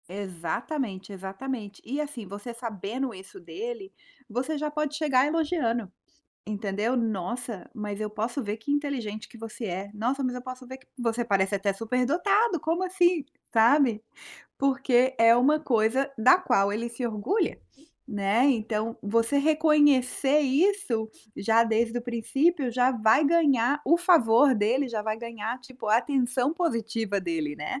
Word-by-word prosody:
Exatamente, 195 Hz, -, -4 dB
exatamente 200 Hz, +2 st, -6 dB
e 280 Hz, +5 st, -2 dB
assim 280 Hz, -8 st, -6 dB
você 205 Hz, +5 st, -7 dB
sabendo 230 Hz, +2 st, -4 dB
isso 190 Hz, -, -12 dB
dele, 435 Hz, 0 st, -7 dB, 0.4 s
você 255 Hz, +7 st, -2 dB
já 300 Hz, +1 st, -2 dB
pode 300 Hz, -1 st, -2 dB
chegar 285 Hz, -4 st, +2 dB
elogiando, 290 Hz, -, -1 dB, 0.5 s
entendeu: 210 Hz, +3 st, -2 dB
"Nossa, 225 Hz, 0 st, -3 dB
mas 210 Hz, -2 st, -5 dB
eu 210 Hz, -, -2 dB
posso 225 Hz, +6 st, -3 dB
ver 210 Hz, 0 st, -3 dB
que 225 Hz, +6 st, -5 dB
inteligente 265 Hz, -8 st, -3 dB
que -, -, -14 dB
você 225 Hz, +1 st, -7 dB
é, 195 Hz, +1 st, -5 dB
nossa 250 Hz, +6 st, -1 dB
mas 255 Hz, -1 st, -1 dB
eu 250 Hz, -, -6 dB
posso 255 Hz, 0 st, -8 dB
ver 260 Hz, +1 st, -8 dB
que 260 Hz, -, -26 dB
você 240 Hz, -1 st, -1 dB
parece 195 Hz, -3 st, +1 dB
até 200 Hz, 0 st, 0 dB
superdotado, 320 Hz, -, +1 dB
como 330 Hz, +5 st, -1 dB
assim?" 355 Hz, -3 st, +2 dB, 0.3 s
Sabe. 230 Hz, -1 st, +4 dB, 0.5 s
Porque 265 Hz, -2 st, +2 dB
é 230 Hz, +1 st, +6 dB
uma 290 Hz, +5 st, +3 dB
coisa 255 Hz, 0 st, +1 dB
da 255 Hz, +12 st, +6 dB
qual 200 Hz, -, +2 dB
ele 230 Hz, +3 st, -3 dB
se 235 Hz, +2 st, -6 dB
orgulha, 230 Hz, -, -1 dB, 0.5 s
né, 205 Hz, +2 st, +1 dB
então 225 Hz, -3 st, 0 dB
você 230 Hz, +6 st, +1 dB
reconhecer 295 Hz, -2 st, +3 dB
isso 275 Hz, -, +1 dB, 0.3 s
já 225 Hz, +3 st, +3 dB
desde 230 Hz, +1 st, 0 dB
o -, -, -7 dB
princípio 260 Hz, +5 st, 0 dB
já 250 Hz, +1 st, +3 dB
vai 225 Hz, +4 st, +3 dB
ganhar 285 Hz, -4 st, +3 dB
o 335 Hz, +5 st, +4 dB
favor 285 Hz, -7 st, +5 dB
dele, 240 Hz, +6 st, +1 dB
já 220 Hz, -3 st, -3 dB
vai 215 Hz, 0 st, -2 dB
ganhar 230 Hz, 0 st, -5 dB
tipo 250 Hz, -1 st, -10 dB
a 215 Hz, -, +5 dB
atenção 255 Hz, +1 st, 0 dB
positiva 225 Hz, -, -1 dB
dele, 160 Hz, -5 st, -3 dB
né. 150 Hz, -, -4 dB
240 Hz, 150 wpm, -26 LUFS, 215-280 Hz, 0.5 s, é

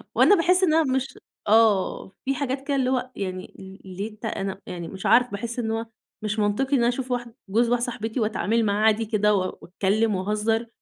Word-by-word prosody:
وأنا 410 Hz, -, +6 dB
باحِس 365 Hz, +1 st, +3 dB
إنّها 325 Hz, -2 st, +4 dB
مش 265 Hz, -1 st, -2 dB, 0.3 s
آه، 215 Hz, -4 st, +3 dB, 0.2 s
في 270 Hz, +1 st, 0 dB
حاجات 270 Hz, 0 st, -3 dB
كده 285 Hz, -, +1 dB
اللي 260 Hz, -2 st, +1 dB
هو 255 Hz, 0 st, -1 dB
يعني 185 Hz, -2 st, -5 dB
ال 190 Hz, 0 st, -11 dB, 0.2 s
ليه 210 Hz, +2 st, -4 dB
ت -, -, -6 dB
أنا 195 Hz, -2 st, -3 dB
يعني 175 Hz, -2 st, -6 dB
مش 190 Hz, 0 st, -8 dB
عارفة، 250 Hz, +1 st, +5 dB
باحِس 230 Hz, +4 st, -4 dB
إن 220 Hz, -2 st, -1 dB
هو 225 Hz, +1 st, -2 dB, 0.4 s
مش 215 Hz, 0 st, -2 dB
منطقي 215 Hz, +7 st, +1 dB
إن 235 Hz, -, +2 dB
أشوف 250 Hz, +2 st, -1 dB
واحد 240 Hz, -1 st, -3 dB, 0.2 s
جوز 230 Hz, +4 st, +2 dB
واحدة 240 Hz, 0 st, +1 dB
صاحبتي 230 Hz, -1 st, -4 dB
وأتعامل 225 Hz, +1 st, +1 dB
معاه 205 Hz, +1 st, +1 dB
عادي 220 Hz, +1 st, +3 dB
كده 210 Hz, -1 st, +2 dB
و 185 Hz, -1 st, -2 dB
وأتكلّم 205 Hz, +4 st, 0 dB
وأهزّر 215 Hz, +4 st, 0 dB
225 Hz, 200 wpm, -24 LUFS, 205-250 Hz, 0.4 s, وأنا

